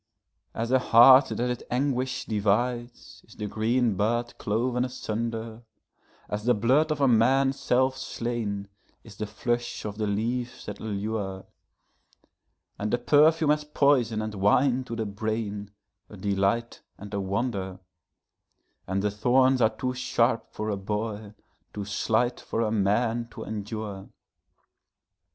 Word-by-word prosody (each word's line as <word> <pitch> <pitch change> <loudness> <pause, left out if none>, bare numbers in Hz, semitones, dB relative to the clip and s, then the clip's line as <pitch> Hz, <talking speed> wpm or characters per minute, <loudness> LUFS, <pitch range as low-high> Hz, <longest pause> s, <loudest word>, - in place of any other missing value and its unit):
As 115 +2 -2
a 130 - +5
heart 130 +3 +7
that - - -5
its 125 - -4
anguish 130 0 -1
divides 120 +4 -1
is 110 - -16
the 105 - -5
green 115 +2 +1
bud 120 +5 -1
cloven 120 +3 0
asunder; 115 -2 -4 0.7
As 105 +1 -4
the 125 0 +4
blood 130 +9 +2
of 150 - -1
a 140 - +4
man 130 +3 +4
self 130 0 +1
slain 115 -6 -3 0.4
is 110 -4 -13
the 105 - -3
flush 120 +3 -3
of 105 0 -5
the 105 - 0
leaves 120 +4 -2
that 105 - -7
allure; 100 -2 -4 1.3
And 105 +1 -2
the - - +2
perfume 150 +5 +4
as 150 0 +1
poison 135 -7 +2
and 110 0 -4
wine 125 +6 +2
to 115 - -5
the 110 -1 -2
brain, 105 0 -3 0.4
a - - -11
delight 100 +4 -1 0.2
and 100 +1 -10
a 100 - -1
wonder; 95 -1 -2 1.1
And 95 +1 -1
the 105 - +1
thorns 130 +5 +3
are 110 - +5
too 125 +3 -3
sharp 120 -2 0
for 110 0 -3
a 100 - -2
boy, 105 +1 -4 0.4
too 100 -1 -4
slight 110 +4 0
for 115 - -3
a 110 -2 0
man, 115 +3 +1
to - - -8
endure. 105 -2 -6
115 Hz, 140 wpm, -27 LUFS, 105-125 Hz, 1.3 s, heart